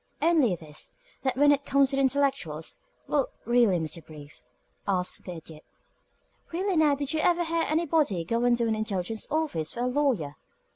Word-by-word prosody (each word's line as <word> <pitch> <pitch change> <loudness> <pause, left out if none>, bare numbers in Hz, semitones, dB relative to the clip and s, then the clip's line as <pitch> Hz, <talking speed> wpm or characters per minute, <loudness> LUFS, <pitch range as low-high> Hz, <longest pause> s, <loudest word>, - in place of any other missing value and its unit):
"Only 310 - +3
this, 155 -2 -9 0.3
that 260 -2 -1
when 290 +1 +6
it 285 0 +2
comes 275 -1 +3
to - - 0
the 275 - +2
intellectuals 265 - 0 0.3
Well, 285 -3 +1 0.2
really, 235 -6 +4
Mr. 160 0 -3
Brief," 150 -2 -13 0.5
asked 185 -2 -1
the 180 - -5
Idiot, 160 -1 -11 0.9
"really 370 +3 -1
now, 305 -3 +4
did 285 +1 -2
you 315 - 0
ever 345 +2 +3
hear 335 0 0
of - - -1
anybody 305 - +1
going 240 +5 +2
to 235 -1 0
an 220 - +1
intelligence 215 -1 -2
office 295 - -1
for 240 - -4
a - - +1
lawyer?" 250 - 0
245 Hz, 180 wpm, -27 LUFS, 180-290 Hz, 0.9 s, when